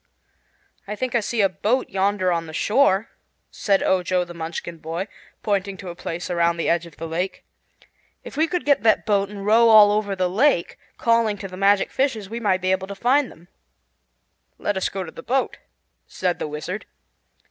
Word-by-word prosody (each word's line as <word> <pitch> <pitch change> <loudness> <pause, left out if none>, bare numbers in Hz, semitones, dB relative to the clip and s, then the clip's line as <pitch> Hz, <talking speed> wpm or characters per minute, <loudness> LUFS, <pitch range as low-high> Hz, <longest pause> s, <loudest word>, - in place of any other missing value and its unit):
"I 210 - -4
think 255 +2 -3
I 240 - +3
see 225 +1 -1
a 195 - +5
boat 220 +7 0
yonder 195 -1 +1
on 165 -1 -1
the 155 - -8
shore," 215 -1 +2 0.4
said 195 -2 +1
Ojo 180 -1 +1
the 175 - -10
Munchkin 165 0 -6
boy, 165 +5 -4 0.4
pointing 200 -2 -1
to 185 -1 -8
a 170 - -7
place 170 0 -5
around 170 -1 +2
the 165 - -1
edge 170 0 +1
of 160 - -17
the 165 - -5
lake. 175 +4 -3 0.8
"If - - -10
we 315 +3 +2
could 360 +1 -2
get 285 -2 +3
that 220 -1 +3
boat 200 -2 +1
and 200 -1 -8
row 230 +2 +5
all 210 -2 +8
over 205 -1 0
the 185 -1 +1
lake, 205 0 +1 0.2
calling 230 -3 +2
to 195 - -6
the 185 - -10
magic 195 +1 +2
fishes, 225 -7 -1
we 230 - -4
might 190 -5 +1
be 185 +1 +1
able 190 0 0
to 200 - -7
find 255 +6 +2
them." 170 +2 -18 1.1
"Let 205 - -2
us 190 - 0
go 195 -1 -4
to 165 - -9
the - - -10
boat," 265 +2 -1 0.5
said 180 -1 -2
the - - -3
Wizard. 155 +7 -6
195 Hz, 200 wpm, -23 LUFS, 175-220 Hz, 1.1 s, all